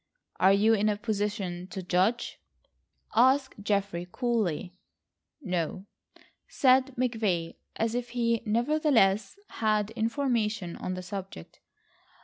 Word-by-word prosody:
"Are 190 - +6
you 210 +3 +4
in 215 0 +2
a 205 - 0
position 205 -5 -3
to 190 0 -6
judge?" 185 +7 0 0.8
asked 260 0 +3
Geoffrey 200 -4 -1
coolly. 210 - -1 0.7
"No," 180 -1 -2 0.6
said 260 0 +3
McVay, 220 -9 -1 0.2
as 225 0 -1
if 245 0 -3
he 235 -1 0
nevertheless 230 - +2
had 215 -1 0
information 225 -5 -1
on 185 - -4
the 185 - -6
subject. 190 - -8
210 Hz, 110 wpm, -28 LUFS, 190-235 Hz, 0.8 s, Are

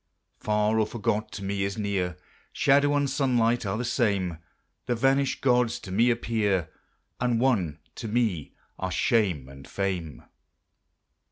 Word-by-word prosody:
Far 105 +1 +1
or 110 - +2
forgot 110 -1 -2
to 100 - -6
me 100 0 -1
is 100 +2 -2
near; 95 -5 -1 0.3
Shadow 145 +1 +3
and 145 -1 +2
sunlight 120 -5 +1
are 95 +2 -1
the 125 - -2
same; 100 - 0 0.5
The 120 - +1
vanished 135 +3 +1
gods 125 -3 +2
to 95 - -8
me 115 +6 +3
appear; 105 -8 0 0.5
And 120 -2 +1
one 100 - +1 0.2
to 115 - -5
me 105 -9 -1 0.2
are 95 - -2
shame 95 - +1
and 70 0 -12
fame. 90 -6 -3
110 Hz, 145 wpm, -27 LUFS, 95-120 Hz, 0.5 s, Shadow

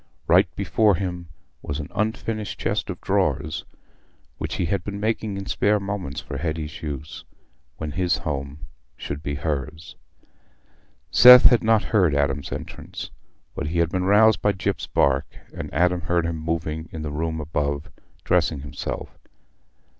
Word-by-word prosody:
Right - - +5
before 105 -3 +2
him 90 -1 -4 0.3
was 70 +1 -4
an 75 - -6
unfinished 110 0 -2
chest - - -1
of - - -5
drawers, 75 +2 0 0.7
which - - -3
he - - -1
had 90 +2 -1
been 100 +1 -5
making 110 -1 -1
in 100 - -5
spare 105 +2 +2
moments 100 -8 -4
for 70 - -6
Hetty's 80 -1 -4
use, 75 0 -6 0.5
when 80 -1 -4
his 90 0 +1
home 70 +1 -5 0.3
should 70 - -5
be 70 -1 -3
hers. 75 0 -4 1.2
Seth 125 +1 +10
had 120 - +6
not 110 -1 +3
heard 90 -9 +2
Adam's 70 -1 0
entrance, - - -7 0.4
but 70 - -4
he 85 +3 -2
had 85 -1 +2
been 90 +1 -1
roused 105 +2 +5
by 105 - +2
Gyp's 95 - -2
bark, 70 0 +2 0.3
and - - -6
Adam 90 +2 +2
heard 85 -2 0
him 85 -1 -2
moving 80 -1 -2
about - - -21
in 80 -1 -5
the 75 - -4
room 80 +2 -2
above, 75 -1 -2 0.3
dressing 70 - +1
himself. 70 +1 -6
80 Hz, 155 wpm, -24 LUFS, 75-100 Hz, 1.2 s, Seth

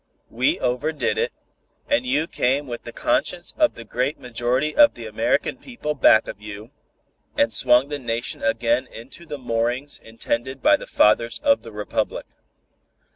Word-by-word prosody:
We 125 +3 +1
overdid 145 - -1
it, 475 +1 0 0.6
and 285 -3 +1
you 160 -11 +1
came 140 -2 0
with 120 -3 -7
the 120 - -7
conscience 170 +8 -1
of 305 -1 +2
the 115 - -9
great 125 +6 -2
majority 125 +5 -1
of 295 -1 +6
the - - -8
American - - 0
people 240 - -5
back 115 -5 +5
of 100 - -8
you, 105 +3 -9 0.7
and 115 - +2
swung 125 +2 +5
the 145 -1 -4
Nation 120 -1 -3
again 215 - +1
into 130 +9 -12
the 145 - -5
moorings 120 +3 -2
intended 115 +3 -4
by 300 +1 +6
the - - -8
Fathers 115 +2 +3
of 280 -1 +4
the 115 - -11
Republic. 105 +1 -3
130 Hz, 160 wpm, -23 LUFS, 115-155 Hz, 0.7 s, of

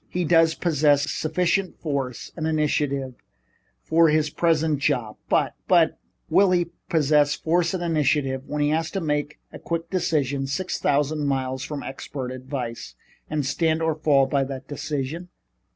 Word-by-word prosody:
He 180 -1 -1
does 165 0 +4
possess 150 -3 +2
sufficient 180 +4 0
force 140 -6 -3
and 160 -2 -2
initiative 145 -4 0 0.7
for 165 0 +4
his 150 -1 +1
present 160 -3 +1
job, 125 -7 -1
but - - +2
" - - -49
"But - - +4 0.3
will 200 -1 +4
he 175 -2 +1 0.2
possess 150 -2 +3
force 170 +2 +1
and 175 - -3
initiative 150 -5 +1
when 150 0 -1
he 145 - +2
has 160 +1 0
to - - +1
make 150 -3 -2 0.2
a - - -8
quick 165 0 -4
decision 145 -7 0
six 175 +7 -2
thousand 145 +1 +1
miles 130 -1 -1
from 145 0 -5
expert 135 -1 -6
advice, 125 - -6 0.3
and 150 -2 -1
stand 160 +3 +1
or 160 0 +2
fall 150 -3 +3
by 140 0 +1
that 135 -1 -7
decision? 150 +4 -4
150 Hz, 155 wpm, -24 LUFS, 140-165 Hz, 0.7 s, does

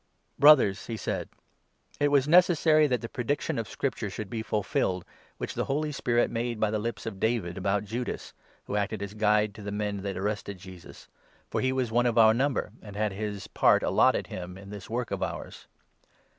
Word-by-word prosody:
" - - -40
Brothers," 135 -10 +6
he 115 - -4
said, - - -3 0.3
" - - -32
it 145 - +3
was 145 -1 +3
necessary 160 -2 +5
that 125 -3 0
the 115 - -4
prediction 140 +5 -2
16 - - 0
of 115 -1 -4
Scripture 125 -6 -2
should 100 0 -6
be 115 - -2
fulfilled, 95 -4 -1 0.3
which - - -4
the - - -2
Holy 150 +2 -1
Spirit 120 -4 +1
made 115 -1 -2
by 110 -1 +1
the 110 - 0
lips 115 0 -4
of 105 -4 -5
David 110 -6 0
about 100 +2 0
Judas, 120 +4 -5 0.3
who - - -5
acted 100 0 -1
as 100 0 -6
guide 105 -1 +2
to 105 - -11
the 100 0 -5
men 105 0 -2
that 100 -1 -4
arrested 100 0 -3
Jesus, 90 -1 -12 0.4
for - - 0
he 130 - +1
was 130 -3 -1
one 120 +2 +3
of 120 -1 0
our 110 -1 +7
number 135 +4 0
and 105 -2 -11
had 105 -1 0
his 105 0 -4
17 - - -11
part - - +4
allotted - - +3
him 90 0 -7
in 100 +1 -11
this 100 -2 -9
work 120 +2 -3
of - - -3
ours." - - -5
110 Hz, 210 wpm, -28 LUFS, 100-125 Hz, 0.4 s, our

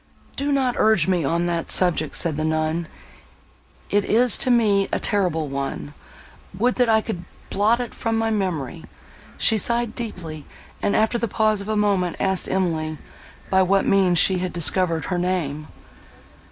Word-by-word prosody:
"Do 285 +1 -2
not 265 -3 +1
urge 215 -7 +4
me 180 -3 +1
on 170 +5 0
that 170 -1 -2
subject," 165 -5 +2
said 165 -3 +1
the 155 - -2
nun, 160 +1 -1 1.0
"it 205 0 +2
is 240 +3 +3
to 255 - +2
me 210 -5 +3
a - - 0
terrible 175 -7 0
one! 135 - -5 0.6
Would 245 +5 +2
that 245 -2 +2
I 220 -1 +4
could 185 -6 -5 0.3
blot 215 +4 +2
it 245 -2 -5
from 225 -1 -2
my 225 0 0
memory!" 170 - -3 0.5
She 220 - +4
sighed 235 +2 -1
deeply, 165 - -7 0.3
and, 200 - 0
after 220 +2 +1
the 235 - -1
pause 215 0 +1
of 200 - -8
a 215 - 0
moment, 195 -4 +1
asked 190 -1 -1
Emily, 160 -4 -1 0.5
by 190 0 +4
what 195 +1 +2
means 185 -3 +3
she 185 +2 +4
had 185 0 -3
discovered 170 -1 0
her 180 -2 -2
name? 160 -5 -2
190 Hz, 165 wpm, -22 LUFS, 165-220 Hz, 1.0 s, urge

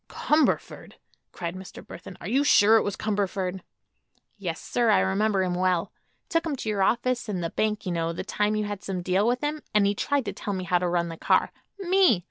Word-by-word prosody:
"Cumberford!" 305 +1 0 0.4
cried 170 0 -5
Mr. 185 -1 -10
Burthon. 185 - -10
"Are - - -7
you 265 +7 +2
sure 225 -6 +6
it - - +3
was 200 - -3
Cumberford?" 195 -3 -2 0.7
"Yes, 180 -5 -4
sir; 240 -2 0
I 205 -3 +5
remember 195 +1 +1
him 180 -1 -1
well. 180 -1 0 0.4
Took 330 0 0
him 300 - -1
to 230 - -5
your 205 -2 0
office 240 +3 +1
and 185 -4 -2
the 165 - -3
bank, 215 -1 -1
you 180 - -2
know, 165 -1 -1
the 170 - -5
time 210 +1 0
you 215 - 0
had 205 -1 -5
some 185 -2 -4
deal 190 +4 +1
with 245 +3 0
him; 300 +1 -2
and 210 -1 +5
he 200 - +2
tried 280 +5 -1
to - - -3
tell 205 -2 -4
me 185 - -4
how 180 0 +1
to 180 - -1
run 170 -1 0
the 165 - -7
car. - - +2 0.3
Me! 370 - +3
200 Hz, 225 wpm, -26 LUFS, 180-225 Hz, 0.7 s, sure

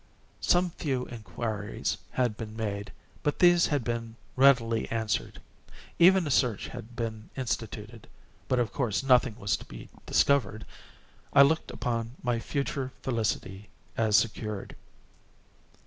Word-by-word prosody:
Some 175 0 +2
few 130 -6 -2
inquiries 110 -2 -4
had 125 -4 +1
been 110 -1 -7
made, 100 -2 -4 0.3
but 145 - 0
these 175 -1 +5
had 145 -5 0
been 115 -1 -3 0.2
readily 125 -4 +4
answered. 110 -2 -2 0.6
Even 185 +1 +6
a 145 - -2
search 120 -6 +1
had 115 +2 -9
been 110 -2 -4
instituted—but 115 0 -5
of 120 -3 0
course 110 -8 0
nothing 130 -3 +4
was 100 -2 0
to - - -12
be - - -11 0.2
discovered. 130 -6 +2 0.7
I 140 - +9
looked 160 +3 +1
upon 115 0 -3
my 120 -2 0
future 140 0 -3
felicity 105 -5 -2 0.3
as 110 -2 +3
secured. 105 -2 -2
115 Hz, 125 wpm, -28 LUFS, 110-135 Hz, 0.7 s, I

